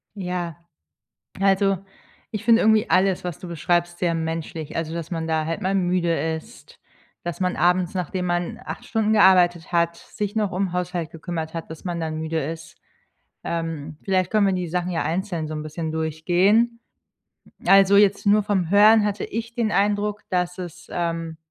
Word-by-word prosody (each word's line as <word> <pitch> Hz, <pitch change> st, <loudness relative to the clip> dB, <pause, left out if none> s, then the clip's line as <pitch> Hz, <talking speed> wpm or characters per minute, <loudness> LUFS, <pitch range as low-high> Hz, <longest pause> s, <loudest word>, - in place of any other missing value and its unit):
Ja. 180 Hz, -4 st, -4 dB, 0.8 s
Also, 195 Hz, 0 st, +3 dB, 0.5 s
ich 215 Hz, 0 st, -4 dB
finde 230 Hz, 0 st, +5 dB
irgendwie 220 Hz, +1 st, +3 dB
alles, 185 Hz, 0 st, +2 dB
was 180 Hz, -4 st, -5 dB
du 180 Hz, -, -8 dB
beschreibst, 175 Hz, +1 st, 0 dB
sehr 175 Hz, -2 st, +1 dB
menschlich. 160 Hz, -1 st, -4 dB
Also, 165 Hz, 0 st, -2 dB
dass 170 Hz, +1 st, -5 dB
man 165 Hz, -1 st, -3 dB
da 160 Hz, -1 st, 0 dB
halt 165 Hz, +1 st, -3 dB
mal 190 Hz, +1 st, 0 dB
müde 180 Hz, -2 st, +1 dB, 0.2 s
ist, 160 Hz, -, -13 dB, 0.4 s
dass 175 Hz, -3 st, -4 dB
man 180 Hz, -1 st, 0 dB
abends, 180 Hz, 0 st, +2 dB
nachdem 180 Hz, 0 st, -2 dB
man 175 Hz, +6 st, -2 dB
8 -, -, -7 dB
Stunden 220 Hz, -1 st, +1 dB
gearbeitet 180 Hz, -5 st, +4 dB
hat, 170 Hz, 0 st, +2 dB
sich 205 Hz, +4 st, -5 dB
noch 210 Hz, -3 st, 0 dB
um 185 Hz, -1 st, -1 dB
Haushalt 180 Hz, -2 st, -3 dB
gekümmert 165 Hz, -1 st, -5 dB
hat, 165 Hz, -1 st, -6 dB
dass 160 Hz, -1 st, -9 dB
man 175 Hz, -2 st, -2 dB
dann 160 Hz, -1 st, -3 dB
müde 160 Hz, +1 st, -2 dB
ist. 165 Hz, +2 st, -7 dB, 0.7 s
Ähm, 165 Hz, -3 st, -4 dB
vielleicht 185 Hz, -2 st, 0 dB
können 210 Hz, -2 st, +3 dB
wir 195 Hz, -, +2 dB
die 180 Hz, -1 st, -2 dB
Sachen 180 Hz, +2 st, -2 dB
ja 165 Hz, -, -1 dB
einzeln 170 Hz, 0 st, -2 dB
so 155 Hz, -, -5 dB
‘n 150 Hz, 0 st, -4 dB
bisschen 155 Hz, +1 st, -4 dB
durchgehen. 175 Hz, +9 st, +2 dB, 0.9 s
Also, 195 Hz, 0 st, +6 dB
jetzt 200 Hz, 0 st, +4 dB
nur 210 Hz, +1 st, +5 dB
vom 190 Hz, -5 st, 0 dB
Hören 210 Hz, +2 st, +6 dB
hatte 205 Hz, -1 st, -1 dB
ich 230 Hz, +1 st, -5 dB
den 230 Hz, -3 st, 0 dB
Eindruck, 205 Hz, +1 st, +1 dB
dass 180 Hz, -1 st, -1 dB
es, 180 Hz, -1 st, -8 dB
ähm 165 Hz, -1 st, -3 dB
180 Hz, 175 wpm, -23 LUFS, 165-195 Hz, 0.9 s, Also